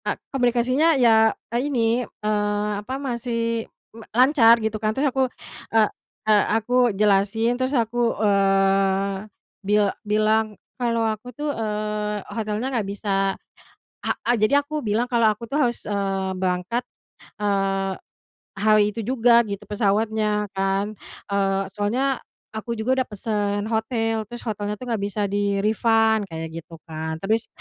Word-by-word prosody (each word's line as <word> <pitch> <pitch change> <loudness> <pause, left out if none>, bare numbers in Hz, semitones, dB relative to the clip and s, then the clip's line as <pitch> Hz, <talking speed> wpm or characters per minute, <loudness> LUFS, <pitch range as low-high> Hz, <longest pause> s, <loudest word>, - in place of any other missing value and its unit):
Ka - - -1 0.2
komunikasinya 255 +5 +2
ya 225 -3 +5 0.2
e - - +2
ini, 235 -2 +1
eee, 210 -2 -1
apa 255 +6 -5
masih 230 -3 -2 0.2
me 225 0 -12
lancar 250 -3 +6
gitu 220 -1 -3
kan, 215 -1 +1
terus 275 -1 +1
aku, 265 -1 +1 0.4
eee 220 -2 +3 0.4
eee, 215 -1 +5
aku 225 +2 -4 0.2
jelasin, 210 +3 +2
terus 255 +2 -2
aku, 235 0 0
eee, 195 0 +2 0.3
bil 205 +1 +2 0.2
bilang 215 0 +1 0.2
kalau 230 -1 +1
aku 220 +2 -3
tuh, 295 0 -2
eee, 210 -2 -3
hotelnya 220 +4 -2
nggak 220 -5 -1
bisa 195 -1 -1 0.7
he - - 0 0.2
eee, - - +5
jadi 285 +6 +3
aku 300 -3 -5
bilang 225 +4 0
kalau 235 -2 +3
aku 230 +2 -10
tuh 290 - 0
harus, 240 -5 +1
eee, 195 -2 -2
berangkat, 185 +6 -1 0.5
eee, 195 -1 0 0.6
hari 215 +1 +4
itu 225 - -4
juga 235 0 +4
gitu 200 0 -5
pesawatnya 210 +1 0
kan. 195 +2 0 0.4
Eee, 195 -1 +1
soalnya 245 +7 0 0.3
aku 220 +2 -4
juga 255 +4 +1
udah 255 - -3
pesen 205 -1 -2
hotel 225 -1 -1
terus 240 +2 -9
hotelnya 210 -2 -3
tuh 210 - -11
gak 225 - 0
bisa 205 +1 -2
di-refund 210 +2 +2
kayak 160 0 -6
gitu 165 +1 -13
kan. 160 -1 -4
Terus, 220 +3 +1
215 Hz, 140 wpm, -23 LUFS, 200-235 Hz, 0.7 s, lancar